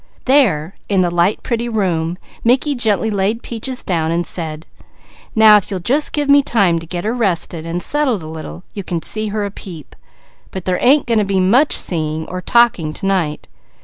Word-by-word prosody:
There 195 - +2 0.2
in 195 -2 +2
the 175 -1 +1
light, 175 +4 +1
pretty 235 0 -2
room, 175 -6 -1 0.3
Mickey 260 +5 +2
gently 220 -3 0
laid 205 +3 -1
Peaches 250 +2 -5
down 165 -3 -1
and 170 +1 -1
said: 160 -2 -4 0.7
"Now 220 -1 +7
if 205 - -3
you'll 195 -2 -3
just 270 - 0
give 295 -1 -1
me 285 0 +6
time 195 -10 +1
to 165 - -11
get 175 +1 -4
her 220 - -1
rested 175 -7 -1
and 175 +2 -3
settled 270 - 0
a - - -8
little, 160 +2 -8
you 200 - -6
can 170 -2 -4
see 215 0 0
her 210 0 -2
a 200 - -5
peep; 170 -7 -11 0.5
but 190 -2 -7
there 185 -1 0
ain't 275 +3 +4
going 230 -2 +1
to - - +2
be 195 -1 0
much 235 +11 +4
seeing 160 -2 0
or 185 0 -5
talking 200 -8 +2
to 195 - -6
night. 180 -6 -1
195 Hz, 200 wpm, -17 LUFS, 170-235 Hz, 0.7 s, Now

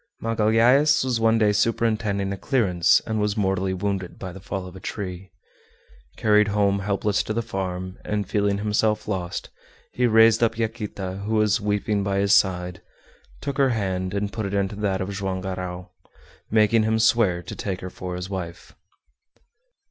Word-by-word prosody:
Magalhaës 115 +7 +3
was 125 -3 0
one 115 0 +3
day 105 -2 +3
superintending 105 -2 0
a - - -5
clearance 95 - +2
and 110 -1 -1
was 105 0 0
mortally 95 -2 0
wounded 95 -1 -3
by 95 - -6
the 95 - -10
fall 95 0 -5
of 90 0 -10
a - - -9
tree. 95 -1 -6 0.9
Carried 105 -1 +4
home 100 -1 +1
helpless 100 +1 0
to 110 - -3
the 115 +1 -1
farm, 95 -2 -5
and 105 -1 -2
feeling 100 -1 +1
himself 105 +1 0
lost, 95 -4 -4 0.4
he 125 0 +1
raised 115 0 +5
up 115 -1 +2
Yaquita, 105 -4 -4
who 110 - 0
was 105 0 +2
weeping 105 0 0
by 100 0 -1
his 100 0 +3
side, 90 -2 +1 0.6
took 140 0 -4
her 135 -1 +4
hand, 95 -4 -2
and 100 0 -2
put 110 -3 -3
it 100 - -3
into 100 0 -1
that 100 -2 -1
of 95 +2 -3
Joam 95 -1 -3
Garral, 90 -1 -5 0.6
making 110 +1 +4
him 110 +1 +1
swear 110 -6 +3
to - - -7
take 95 -2 -4
her 95 - -6
for 90 -1 -6
his 90 +1 -5
wife. 90 -3 -7
100 Hz, 170 wpm, -24 LUFS, 95-110 Hz, 0.9 s, raised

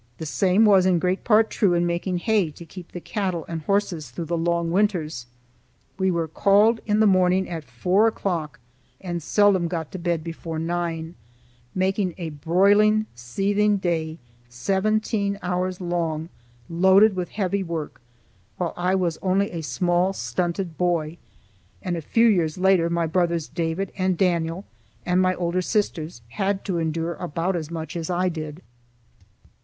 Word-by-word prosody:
The 160 - -6
same 190 +7 +3
was 195 -3 +5
in 180 -2 +3
great 180 +2 -1
part 220 -1 +4
true 190 -5 +2
in 175 0 +2
making 175 +1 -1
hay 205 -2 +1
to 160 +3 -12
keep 175 +2 -11
the 175 - -6
cattle 185 -3 -3
and 165 -1 -4
horses 180 -5 -1
through 150 +7 -6
the 170 +2 -2
long 170 0 0
winters. 170 - 0 0.7
We 190 0 +2
were 170 -2 0
called 205 +7 +3
in 210 0 +2
the 220 - +5
morning 185 -1 +3
at 165 -3 -5
four 180 - +2
o'clock 175 -8 -2 0.4
and 175 -2 -4
seldom 195 +1 +3
got 165 -3 -4
to 190 - -6
bed 170 -2 -1
before 165 -1 -6
nine, 165 0 -3 0.6
making 190 -1 0
a 170 -3 -5
broiling, 200 +8 +3
seething 200 - 0
day 165 -4 -2 0.3
seventeen 200 - 0
hours 180 0 -1
long 170 -3 -2 0.4
loaded 190 +4 +5
with 180 -2 -3
heavy 200 -1 -1
work, 165 -7 -5 0.6
while 175 -2 -2
I 180 +2 +1
was 175 -4 -1
only 195 +2 +1
a 170 - -4
small 175 +4 +1
stunted 170 - -3
boy; 170 -2 0 0.7
and 180 -1 -2
a 165 - -4
few 230 +9 +2
years 175 -8 +2
later 185 -2 +3
my 170 0 0
brothers 170 -1 0
David 170 +3 -2
and 185 -2 0
Daniel 170 0 0 0.4
and 180 +1 +2
my 185 0 +2
older 175 +1 -1
sisters 170 - -2
had 195 - -2
to 185 -4 -1
endure 165 +1 -1
about 175 +2 -2
as 160 -3 -4
much 160 -2 -6
as 165 -1 -4
I 180 +1 +1
did. 155 0 -6
175 Hz, 160 wpm, -24 LUFS, 165-190 Hz, 0.7 s, was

